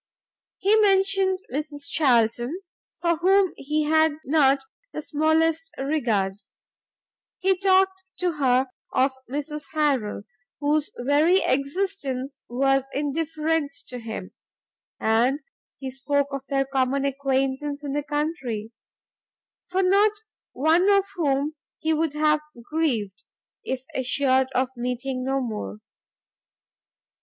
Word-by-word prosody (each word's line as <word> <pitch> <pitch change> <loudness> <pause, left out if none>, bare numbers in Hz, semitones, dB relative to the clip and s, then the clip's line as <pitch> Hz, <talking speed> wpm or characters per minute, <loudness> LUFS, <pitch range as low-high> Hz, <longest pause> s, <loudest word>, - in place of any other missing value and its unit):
He 405 +3 +3
mentioned 390 -2 +3
Mrs 290 0 -3
Charlton, 245 - +2 0.4
for 340 -1 +2
whom 380 +2 +3
he 305 +2 -1
had 315 0 +3
not 275 -2 +4 0.3
the - - -5
smallest 320 +2 +1
regard; 230 -9 0 1.0
he 380 +1 +2
talked 380 0 +3
to 360 -1 +1
her 260 -1 +3 0.3
of 265 +1 +3 0.2
Mrs 295 +2 -4
Harrel, 270 -10 0 0.4
whose 295 +1 +1
very 295 +9 +3
existence 275 -2 -2
was 270 +2 +2
indifferent 310 +1 -1 0.2
to 250 - -5
him; 220 -5 -6 0.7
and 235 +6 +2 0.4
he 265 -1 -6
spoke 285 +1 0
of 275 -1 -5
their 270 -1 +1
common 270 0 0
acquaintance 275 +1 -1
in 275 - -3
the 295 - 0
country, 290 -7 -3 1.0
for 375 +1 0
not 400 +3 +4 0.4
one 325 +7 +3
of 395 -1 +4
whom 290 -3 0 0.2
he 320 0 0
would 315 -1 0
have 305 0 +3 0.3
grieved, 230 -12 -1 0.4
if 260 -1 -3
assured 260 0 +2
of 255 0 +2
meeting 250 +1 -3
no 270 +1 0
more. 210 - -4
285 Hz, 110 wpm, -25 LUFS, 260-320 Hz, 1.0 s, not